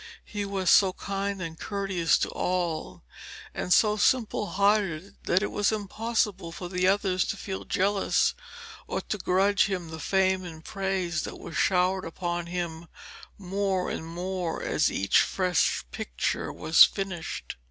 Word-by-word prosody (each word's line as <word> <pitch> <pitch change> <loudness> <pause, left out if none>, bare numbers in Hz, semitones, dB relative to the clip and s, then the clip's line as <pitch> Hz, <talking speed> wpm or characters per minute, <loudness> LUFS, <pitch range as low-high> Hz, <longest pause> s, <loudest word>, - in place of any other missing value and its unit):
He 205 -1 -4
was 195 -3 +1
so 190 -2 +6
kind 195 0 -3
and 165 -1 -7
courteous 195 -5 +1
to - - -1
all, 175 - -2 0.5
and 180 - -4
so 210 +2 +5
simple 220 -2 +2
hearted 200 -3 +1
that 185 +3 +2
it - - -2
was 205 +1 +1
impossible 210 -3 -1
for 175 +1 -6
the 180 0 +1
others 190 -2 +2
to 210 - -3
feel 190 -1 -5
jealous 200 +1 +2 0.5
or - - -2
to 210 - -4
grudge 195 +2 +3
him 180 -4 -3
the 160 0 -7
fame 190 +2 +1
and 160 -3 -9
praise 190 -4 -1
that - - -6
was 165 - -9
showered 185 +2 +2
upon 175 0 -3
him 170 -1 -4 0.5
more 195 -1 -1
and 160 - -5
more 180 0 -3
as - - +1
each 100 0 +3
fresh 180 - +1
picture - - -2
was 160 +1 +6
finished. 190 -5 -2
185 Hz, 150 wpm, -27 LUFS, 175-200 Hz, 0.5 s, so